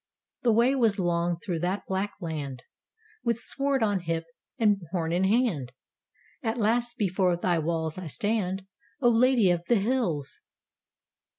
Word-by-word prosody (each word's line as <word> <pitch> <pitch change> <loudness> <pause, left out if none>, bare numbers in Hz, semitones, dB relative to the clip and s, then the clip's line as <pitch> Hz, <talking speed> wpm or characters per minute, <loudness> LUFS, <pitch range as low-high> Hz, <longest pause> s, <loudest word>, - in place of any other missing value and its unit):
The 240 - +3
way 235 +4 +4
was 230 -6 +2
long 175 -2 0
through 170 -2 -3
that 185 +4 -2
black 190 +2 -2
land. 145 -7 -5 0.6
With 235 -1 +1
sword 275 +1 -1
on 205 -3 +2
hip 165 -1 -2 0.3
and 205 -3 +3
horn 165 -2 -1
in 180 +2 +2
hand, 190 - +1 0.7
At 230 -2 -1
last 235 +2 +1
before 185 -3 +1
thy 175 -1 +1
walls 160 +1 -2
I 185 - -6
stand, 190 +2 -1 0.3
O 245 -4 +4
Lady 235 -4 +4
of 175 -1 0
the 240 - +3
Hills! 200 - -1
190 Hz, 150 wpm, -27 LUFS, 170-230 Hz, 0.7 s, way